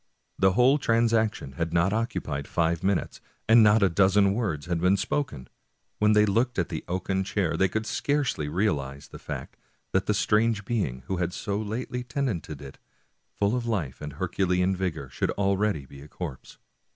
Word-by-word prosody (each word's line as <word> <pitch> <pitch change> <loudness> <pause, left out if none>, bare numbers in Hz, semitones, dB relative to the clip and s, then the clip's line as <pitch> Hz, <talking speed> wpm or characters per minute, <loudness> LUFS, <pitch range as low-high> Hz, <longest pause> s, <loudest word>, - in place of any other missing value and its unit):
The 95 0 +4
whole 130 +7 +4
transaction 115 - +1
had 85 -1 -1
not 85 +4 +2
occupied 75 -11 -2
five 85 -1 0
minutes, 95 0 -1 0.3
and 115 +1 +7
not 105 0 +5
a - - +6
dozen 100 +2 +4
words 95 -10 -2
had 85 -1 -2
been 90 +2 +4
spoken. 95 - -2 0.5
When 105 0 +4
they 105 0 +5
looked 115 +5 +1
at 90 - 0
the 80 - -4
oaken 95 +2 -1
chair 95 -3 -1
they 95 - +3
could 110 +3 -2
scarcely 140 - -1
realize 70 -7 -1
the - - -10
fact - - -7 0.3
that 95 0 +1
the 105 - +2
strange 105 0 +2
being 80 - -2
who 95 - -2
had 85 0 -1
so 100 +1 -3
lately 120 +3 -4
tenanted 115 - -3
it, 70 - -11 0.6
full 100 +3 +1
of 120 -2 -2
life 95 - -2
and 75 -1 -6
Herculean 90 +3 0
vigor, 90 -7 -3
should - - -1
already 100 -5 +1
be 70 +1 -13
a 70 - -11
corpse. 75 -5 -8
95 Hz, 175 wpm, -27 LUFS, 85-110 Hz, 0.6 s, and